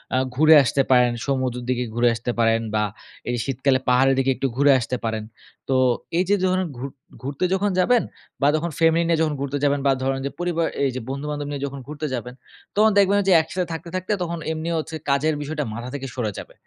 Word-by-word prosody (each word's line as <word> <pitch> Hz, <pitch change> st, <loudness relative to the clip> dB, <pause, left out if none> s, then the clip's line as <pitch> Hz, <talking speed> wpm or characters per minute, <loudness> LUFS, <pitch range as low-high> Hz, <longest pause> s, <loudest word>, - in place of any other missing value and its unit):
আ -, -, +3 dB, 0.2 s
ঘুরে 155 Hz, +3 st, +7 dB
আসতে 135 Hz, +2 st, +1 dB
পারেন, 125 Hz, -1 st, +5 dB
সমুদ্রর 130 Hz, -3 st, -1 dB
দিকে 125 Hz, -1 st, 0 dB
ঘুরে 120 Hz, +1 st, +3 dB
আসতে 120 Hz, +2 st, -3 dB
পারেন 115 Hz, 0 st, +3 dB
বা 105 Hz, -, +2 dB, 0.5 s
এই 120 Hz, -, 0 dB
শীতকালে 135 Hz, 0 st, +1 dB
পাহাড়ের 135 Hz, +2 st, +4 dB
দিকে 135 Hz, 0 st, +2 dB
একটু 135 Hz, -, -1 dB
ঘুরে 140 Hz, +1 st, +5 dB
আসতে 125 Hz, +1 st, -3 dB
পারেন। 110 Hz, -1 st, -2 dB, 0.5 s
তো 135 Hz, -, +2 dB, 0.4 s
এই 180 Hz, -, +3 dB
যে 205 Hz, -, +5 dB
যখন 185 Hz, 0 st, +2 dB
ঘুর 135 Hz, +3 st, -5 dB, 0.3 s
ঘুরতে 140 Hz, +6 st, -2 dB
যখন 195 Hz, +1 st, +1 dB
যাবেন 240 Hz, +6 st, +4 dB, 0.4 s
বা 140 Hz, -, +4 dB
যখন 165 Hz, +2 st, -1 dB
ফ্যামিলি 165 Hz, +1 st, +4 dB
নিয়ে 165 Hz, -1 st, +2 dB
যখন 155 Hz, -2 st, +1 dB
ঘুরতে 140 Hz, +1 st, -2 dB
যাবেন 145 Hz, 0 st, +2 dB
বা -, -, +5 dB
ধরেন 135 Hz, 0 st, 0 dB
যে 140 Hz, -, -2 dB
পরিবার 170 Hz, -2 st, 0 dB, 0.2 s
এই 135 Hz, -, +3 dB
যে 130 Hz, -, -3 dB
বন্ধু-বান্ধব 145 Hz, +1 st, -4 dB
নিয়ে 140 Hz, -1 st, -4 dB
যখন 140 Hz, 0 st, -6 dB
ঘুরতে 150 Hz, +1 st, -4 dB
যাবেন 125 Hz, 0 st, -4 dB, 0.4 s
তখন 215 Hz, +1 st, +5 dB
দেখবেন 200 Hz, 0 st, +4 dB
ওইযে -, -, -5 dB
যে 185 Hz, -, +6 dB
একসাথে 180 Hz, +3 st, -3 dB
থাকতে, 165 Hz, +1 st, -7 dB
থাকতে 185 Hz, +3 st, -3 dB
তখন 170 Hz, 0 st, -4 dB
এমনি 160 Hz, +1 st, -3 dB
হচ্ছে 160 Hz, 0 st, -4 dB
কাজের 150 Hz, +3 st, +2 dB
বিষয়টা 150 Hz, +1 st, -3 dB
মাথা 120 Hz, +2 st, -6 dB
থেকে 135 Hz, -1 st, -5 dB
সরে 115 Hz, -5 st, -1 dB
যাবে। -, -, -9 dB
140 Hz, 215 wpm, -23 LUFS, 130-165 Hz, 0.5 s, ঘুরে